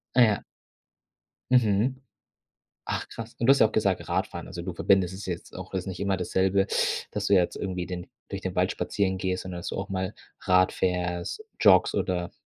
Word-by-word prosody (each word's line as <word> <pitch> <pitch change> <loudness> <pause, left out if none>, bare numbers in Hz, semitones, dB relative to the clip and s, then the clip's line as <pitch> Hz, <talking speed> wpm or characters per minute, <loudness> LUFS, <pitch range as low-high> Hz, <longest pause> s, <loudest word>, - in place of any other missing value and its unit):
Ah, 125 - +6
ja. 105 -3 +3 1.1
Mhm. 125 +2 +3 0.9
Ach, - - -2
krass. 115 +1 -8
Und 115 - +1
du - - +9
hast 140 - +5
ja 110 - +7
auch 110 - -11
gesagt, 100 -4 0
Radfahren, - - -2
also, 85 - -6
du 90 0 -5
verbindest 95 0 +2
es 100 +2 -7
jetzt 90 -2 -6
auch 95 +1 -8
es 95 - +1
ist - - -12
nicht 95 - -5
immer 100 -1 0
dasselbe, 95 +2 +1 0.4
dass 105 0 -3
du 100 - +3
jetzt 90 -2 +3
irgendwie 90 -2 -3
den 90 -1 -5 0.2
durch - - -5
den - - -4
Wald - - +2
spazieren 95 -2 -1
gehst, 95 0 -2
sondern 90 -1 -6
dass - - -5
du - - -4
auch 95 - -4
mal 95 +1 -2 0.3
Rad 90 0 +4
fährst, 90 - -1 0.2
joggst 95 -4 +6
oder 90 -2 -1
95 Hz, 200 wpm, -27 LUFS, 90-100 Hz, 1.1 s, du